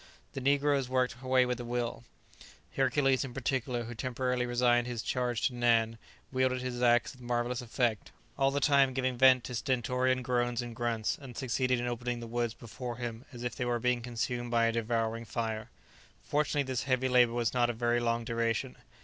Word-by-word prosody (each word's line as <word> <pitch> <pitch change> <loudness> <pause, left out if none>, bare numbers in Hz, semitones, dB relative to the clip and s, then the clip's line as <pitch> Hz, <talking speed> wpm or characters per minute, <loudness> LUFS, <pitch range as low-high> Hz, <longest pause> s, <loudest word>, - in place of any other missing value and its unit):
The 135 - -4
negroes 140 -1 +2
worked 125 -2 +1
away 130 -1 +3
with 125 0 -2
a - - -4
will; 120 0 -3 0.7
Hercules, 135 0 +2
in 125 -3 -7
particular, 130 -2 -1
who 120 +1 -7
temporarily 125 +1 -1
resigned 120 0 +2
his 120 -2 -4
charge 125 -2 -1
to 130 - +1
Nan, 115 -2 +2 0.3
wielded 130 -1 +1
his 125 -1 -4
axe 120 -1 +4
with 130 - -17
marvellous 120 +1 -1
effect, 120 -2 -1 0.2
all 135 -1 +3
the 140 +1 0
time 140 -2 +4
giving 130 -1 0
vent 130 0 +6
to 125 - -6
stentorian 130 0 0
groans 120 -1 0
and 120 -1 -7
grunts, 115 -2 -1
and 125 -4 -10
succeeded 130 -1 0
in 120 - -2
opening 120 0 -2
the 120 - -6
woods 120 0 -2
before 120 +1 -7
him 120 0 -5
as 120 -2 -8
if 125 -2 -3
they 125 - -2
were 120 -1 +1
being 125 +1 +1
consumed 120 0 -3
by 115 -1 +3
a 115 - +3
devouring 115 0 -1
fire. 110 +1 -3 0.5
Fortunately 145 0 +1
this 130 -2 -3
heavy 130 0 +2
labour 125 -2 +4
was 120 -1 0
not 120 -1 +2
of 120 - -3
very 120 0 +2
long 115 0 0
duration. 115 +2 -1
120 Hz, 190 wpm, -31 LUFS, 120-130 Hz, 0.7 s, vent